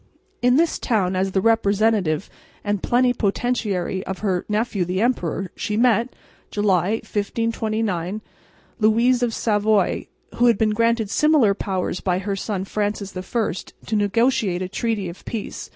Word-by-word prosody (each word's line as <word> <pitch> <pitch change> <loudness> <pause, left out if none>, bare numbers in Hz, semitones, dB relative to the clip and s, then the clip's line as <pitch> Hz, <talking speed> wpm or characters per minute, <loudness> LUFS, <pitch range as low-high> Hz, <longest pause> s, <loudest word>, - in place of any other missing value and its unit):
In 245 +1 +4
this 330 +3 +2
town, 190 -5 0
as 190 +1 0
the 190 - +2
representative 205 -5 +2 0.4
and 205 -2 -1
plenipotentiary 220 -6 0
of 190 - -3
her 185 -3 0
nephew 210 -2 0
the 180 +2 -2
emperor, 195 -6 -1
she 210 - -2
met, 235 +1 +2 0.3
July, 200 -2 +1
1529, 215 -3 -2 0.6
Louise 235 +3 +3
of 240 -1 +1
Savoy, 215 -2 +1 0.3
who 245 - +4
had 230 -3 +4
been 215 0 +2
granted 230 -1 +1
similar 300 -9 +4
powers 190 -2 -2
by 180 -2 0
her 195 +1 -2
son 195 -1 -3
Francis 205 -1 -3
I, 210 +5 -1 0.3
to 220 - -2
negotiate 205 -2 +1
a - - -3
treaty 210 0 -2
of 170 +1 -9
peace. 225 -3 -6
210 Hz, 140 wpm, -22 LUFS, 190-230 Hz, 0.6 s, In